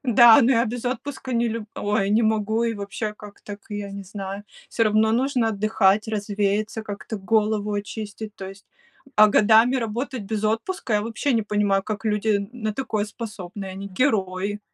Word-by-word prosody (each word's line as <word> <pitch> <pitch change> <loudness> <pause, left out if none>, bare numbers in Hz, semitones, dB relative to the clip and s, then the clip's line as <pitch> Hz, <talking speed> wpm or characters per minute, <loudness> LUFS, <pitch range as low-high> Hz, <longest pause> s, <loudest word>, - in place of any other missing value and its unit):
Да, 240 -2 +7
но 245 +3 +4
я 230 -1 +3
без 240 +2 -5
отпуска 260 +1 -4
не 235 0 +1
люб 225 -1 -5
ой, 205 -1 0
не 225 +2 +3
могу, 220 +1 +1
и 230 -1 0
вообще, 210 +1 -4
как 210 -1 -13
так, 205 0 -9
я 205 -1 -4
не 200 0 -7
знаю. 195 +1 -6 0.2
Всё 225 - +1
равно 215 +1 +3
нужно 250 -1 +1
отдыхать, 215 0 +2
развеяться, 210 +1 -1
как-то 205 +1 -6
голову 210 +1 +1
очистить, 210 +1 -5
то 190 -1 -7
есть. 195 0 -13 0.5
А 215 - +8
годами 220 +5 +5
работать 240 +1 -3
без 215 +1 -3
отпуска, 225 - -1
я 210 - +2
вообще 230 +5 -1
не 225 - +2
понимаю, 205 -2 +1
как 215 +1 -5
люди 210 0 0
н 200 0 -4
на 220 -4 -3
такое 215 -6 -2
способны, 210 -3 -7
они- 190 +1 -7
герои. 205 -5 0
215 Hz, 180 wpm, -23 LUFS, 205-230 Hz, 0.5 s, А